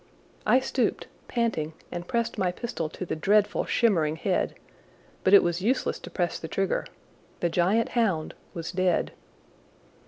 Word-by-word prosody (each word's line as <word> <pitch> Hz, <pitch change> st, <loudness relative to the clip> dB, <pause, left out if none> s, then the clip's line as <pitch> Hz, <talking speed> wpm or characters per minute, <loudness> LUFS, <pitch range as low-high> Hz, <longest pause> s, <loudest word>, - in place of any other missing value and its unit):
I 255 Hz, -, +6 dB
stooped, 260 Hz, -1 st, -1 dB, 0.2 s
panting, 225 Hz, -10 st, -1 dB, 0.2 s
and 175 Hz, 0 st, -5 dB
pressed 235 Hz, -1 st, -1 dB
my 185 Hz, -2 st, +2 dB
pistol 180 Hz, -6 st, -4 dB
to 185 Hz, -, -6 dB
the -, -, -2 dB
dreadful, 205 Hz, +6 st, +2 dB
shimmering 165 Hz, -10 st, +2 dB
head, 180 Hz, +3 st, 0 dB, 0.7 s
but 185 Hz, -, +3 dB
it 200 Hz, -, +9 dB
was 175 Hz, +1 st, 0 dB
useless 245 Hz, +7 st, 0 dB
to -, -, -9 dB
press 175 Hz, -3 st, -1 dB
the 160 Hz, -, -6 dB
trigger. 195 Hz, +4 st, -1 dB, 0.5 s
The 175 Hz, -, +1 dB
giant 185 Hz, +7 st, +2 dB
hound 195 Hz, -10 st, 0 dB, 0.2 s
was 165 Hz, -1 st, -4 dB
dead. 185 Hz, -1 st, +1 dB
185 Hz, 150 wpm, -27 LUFS, 170-225 Hz, 0.7 s, it